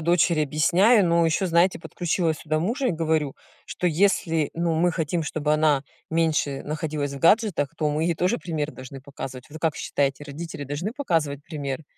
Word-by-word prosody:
дочери 170 -1 +3
объясняю, 180 - +4
но 170 0 +3
ещё, 165 +4 +1
знаете, 170 +2 +3
подключила 170 -1 -1
сюда 155 +1 -2
мужа 240 - 0
и - - +2
говорю, 160 -3 0 0.3
что 180 - -3
если, 165 -3 +2
ну, 170 -1 0
мы 175 +2 +2
хотим, 165 0 -1
чтобы 150 0 -1
она 150 -3 +3 0.3
меньше 160 -4 0
находилась 150 -2 -3
в 140 - -6
гаджетах, 185 - +3
то 155 - 0
мы 155 +2 0
ей 170 - +1
тоже 180 +8 +1
пример 155 -3 -3
должны 130 +1 -10
показывать. 130 -1 -8
Вы 155 +2 -9
как 160 -1 0
считаете, 140 0 -1
родители 145 0 -7
должны 145 - -4
показывать 165 - -1
примеры? 145 -2 -5
160 Hz, 175 wpm, -24 LUFS, 145-170 Hz, 0.3 s, объясняю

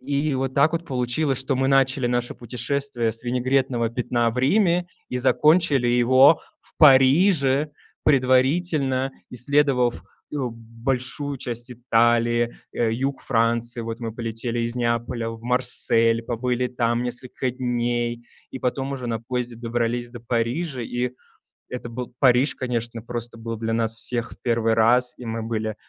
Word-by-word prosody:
И 145 0 -1
вот 130 0 -2
так 150 +3 +4
вот 170 0 -2
получилось, 130 +2 -1
что 135 0 -1
мы 135 0 +1
начали 135 -2 +3
наше 120 0 -1
путешествие 125 0 -2
с 115 - -5
винегретного 125 -1 0
пятна 120 0 0
в 125 - -5
Риме 175 +5 +2 0.2
и 125 - -2
закончили 150 -2 +3
его 130 +5 +5 0.2
в - - -16
Париже, 140 0 +5 0.3
предварительно 135 0 +2 0.2
исследовав, 125 - +1 0.3
э, 150 - -3
большую 125 +3 -3
часть 120 0 -5
Италии, 120 0 +2 0.2
э, 115 -2 +1
юг 135 +3 -2
Франции. 115 0 0
Вот 115 0 -5
мы 115 -2 -4
полетели 115 0 -3
из 115 +1 -2
Неаполя 115 -1 -1
в 115 0 -9
Марсель, 115 -2 +1
побыли 125 +2 -1
там 120 -1 0
несколько 125 +1 -4
дней, 120 -1 -2 0.2
и 130 - -6
потом 135 +2 -2
уже 130 -3 -5
на 115 -2 -2
поезде 120 0 -4
добрались 120 +1 -2
до 120 -1 -10
Парижа. 125 +5 -2
И 120 +1 -2 0.6
это 120 -1 -6
был 120 +1 -6
Париж, 130 +1 +4
конечно, 120 -2 -3
просто 120 0 -6
был 115 0 -5
для 115 0 -2
нас 115 -1 0
всех 120 +1 -4
в - - -12
1 115 -2 +1
раз, 125 +3 +3
и 125 - -9
мы 115 0 -3
были 110 -1 -3
125 Hz, 150 wpm, -23 LUFS, 115-130 Hz, 0.6 s, его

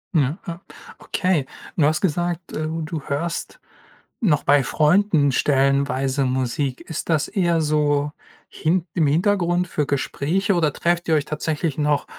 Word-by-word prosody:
Ja, 145 +1 +2
ja. 170 +1 -6 0.4
Okay, 180 -8 0 0.3
du 160 - +2
hast 155 +1 +2
gesagt, 175 0 -1
ähm, 155 +1 -3
du 155 -1 -4
hörst 145 +5 -4 0.6
noch 160 -10 +2
bei 145 -1 +4
Freunden 155 +1 +3
stellenweise 135 0 +1
Musik. 130 +1 -1
Ist 160 +1 -6
das 155 -3 +2
eher 170 -4 +1
so 150 -1 +1 0.4
hint 170 +2 0
im 160 -4 +2
Hintergrund 175 +2 +1
für 150 -4 -2
Gespräche 160 +8 0
oder 165 -4 +2
trefft 170 +3 0
ihr 160 - +3
euch 145 -2 +1
tatsächlich 155 0 -2
noch, 150 -1 +1
155 Hz, 145 wpm, -22 LUFS, 145-170 Hz, 0.6 s, bei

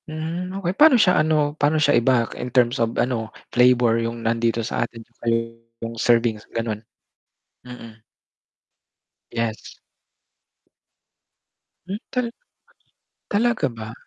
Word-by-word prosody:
Hmm, 165 +3 -4
okey. 180 -2 -2
Pa'no 295 +3 +6
siya 185 -7 +4
ano? 155 -2 +1
Paano 150 0 +1
siya 145 -2 +3
i-back, 120 -1 +2
in 125 - -5
terms 125 0 +2
of 115 0 -1
ano, 115 -3 -1 0.2
flavor 125 -2 +4
'yung 115 0 -4
nandito 115 0 0
sa - - -2
atin 115 -1 -12 0.8
yung 115 0 -5
servings, 115 -3 +2
gan'on. 115 -2 -2 0.9
Mm. 115 -3 -11 1.3
Yes. 115 -1 -4 2.1
Hmm. 195 +2 -3 0.2
Tal 250 -2 0 1.0
talaga 225 - +1
ba? 110 -1 -8
125 Hz, 110 wpm, -22 LUFS, 115-155 Hz, 2.1 s, Pa'no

